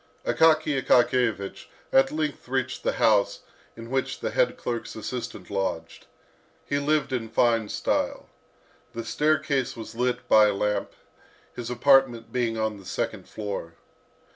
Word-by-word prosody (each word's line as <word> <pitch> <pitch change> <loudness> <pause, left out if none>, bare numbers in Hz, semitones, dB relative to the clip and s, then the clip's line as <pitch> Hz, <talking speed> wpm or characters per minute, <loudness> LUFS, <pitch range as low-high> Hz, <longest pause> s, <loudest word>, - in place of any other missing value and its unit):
Akaky 155 -3 +3
Akakiyevich 120 -5 +2 0.3
at 135 0 +5
length 150 -4 -3
reached 130 0 -2
the - - 0
house 105 -3 +2 0.4
in 115 +1 -9
which 135 -1 -1
the - - -3
head - - +1
clerk's 120 -1 -4
assistant 110 -3 -6
lodged. 95 -1 -3 0.6
He 140 - 0
lived 150 -1 0
in 115 -3 -2
fine 115 -2 +2
style. - - -1 0.7
The 115 -1 -5
staircase 145 -3 0
was 115 - -8
lit 125 +1 -1
by 110 -1 +6
a 105 - 0
lamp, 105 +1 -1 0.6
his 120 -1 -5
apartment 125 -2 +3
being 115 -3 0
on 110 -1 -1
the 95 - -15
second 95 - -4
floor. 100 -6 -5
120 Hz, 140 wpm, -26 LUFS, 110-135 Hz, 0.7 s, by